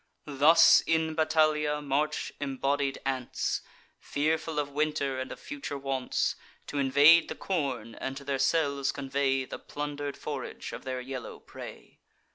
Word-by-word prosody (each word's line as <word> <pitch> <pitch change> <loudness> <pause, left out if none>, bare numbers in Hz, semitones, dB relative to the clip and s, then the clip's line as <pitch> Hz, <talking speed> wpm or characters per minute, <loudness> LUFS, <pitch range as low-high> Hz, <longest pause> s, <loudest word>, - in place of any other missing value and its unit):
Thus, 150 +4 +6
in 160 -1 +1
battalia, 155 -1 +2
march 145 +1 -1
embodied 140 0 -1
ants, 130 -2 -1 0.4
Fearful 155 +2 -1
of 145 -1 -1
winter, 145 -2 -1
and 130 - -5
of - - -8
future 280 - -6
wants, 135 -2 -1 0.3
T' 145 - -4
invade 145 +5 +6
the - - -4
corn, 135 - -2
and 135 +3 -5
to 140 - -8
their 140 -1 -2
cells 140 -1 +1
convey 135 -1 0
The - - -7
plunder'd 145 -1 -5
forage - - -6
of - - -8
their 130 -1 -3
yellow 130 -1 -7
prey. - - -11
140 Hz, 140 wpm, -29 LUFS, 135-155 Hz, 0.4 s, Thus